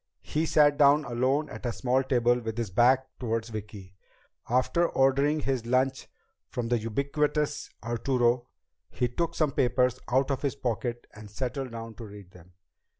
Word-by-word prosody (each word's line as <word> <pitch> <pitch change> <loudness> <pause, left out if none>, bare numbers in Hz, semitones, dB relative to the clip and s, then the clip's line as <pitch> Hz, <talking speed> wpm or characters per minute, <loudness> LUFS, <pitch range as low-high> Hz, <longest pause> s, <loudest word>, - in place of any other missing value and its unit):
He 160 +2 -1
sat 145 -2 +4
down 145 +1 +5
alone 130 +5 0
at - - -9
a - - 0
small 130 +2 +1
table 120 -2 +2
with 110 -1 -5
his 115 -5 -3
back 130 +5 +4
toward 115 -2 -1
Vicki. 105 -4 -8 0.6
After 130 +8 +2
ordering 140 +3 +2
his 130 -4 -2
lunch 130 +2 +1 0.4
from 120 -2 -3
the 120 -1 +2
ubiquitous 145 +6 -1
Arturo, 120 0 +1 0.4
he 125 - -1
took 165 +8 -2
some 155 -3 +1
papers 125 -1 +1
out 130 +3 +1
of 135 - -2
his 140 -2 -1
pocket 120 -2 -3
and 105 -1 -11
settled 130 +4 -4
down 115 0 -7
to 115 - -9
read 100 -2 -12
them. 90 0 -17
125 Hz, 160 wpm, -28 LUFS, 115-140 Hz, 0.6 s, down